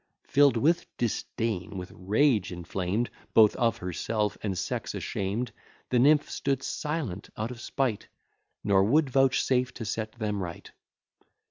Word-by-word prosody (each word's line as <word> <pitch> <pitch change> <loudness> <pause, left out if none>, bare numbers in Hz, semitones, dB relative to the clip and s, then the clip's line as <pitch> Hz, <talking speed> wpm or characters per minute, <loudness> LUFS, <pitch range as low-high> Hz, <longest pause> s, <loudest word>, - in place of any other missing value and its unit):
Filled 140 -4 +4
with 160 +8 +2
disdain, 110 -4 -2
with 90 0 -6
rage 105 +1 +2
inflamed 90 +6 -2 0.2
Both 110 -2 +7
of 115 -1 +2
herself 105 +4 -2
and 95 -3 -2
sex - - -3
ashamed, 105 +5 -2 0.4
The 125 - +3
nymph 145 +3 +5
stood 140 -1 -1
silent 145 - -3
out 110 +3 -2
of 120 -1 -9
spite, 130 -7 -1 0.6
Nor 95 -1 +4
would 140 +6 +3
vouchsafe 130 -1 +3
to 115 - -5
set 110 +1 -3
them 105 -3 -2
right. 85 -2 -7
115 Hz, 135 wpm, -28 LUFS, 100-130 Hz, 0.6 s, Both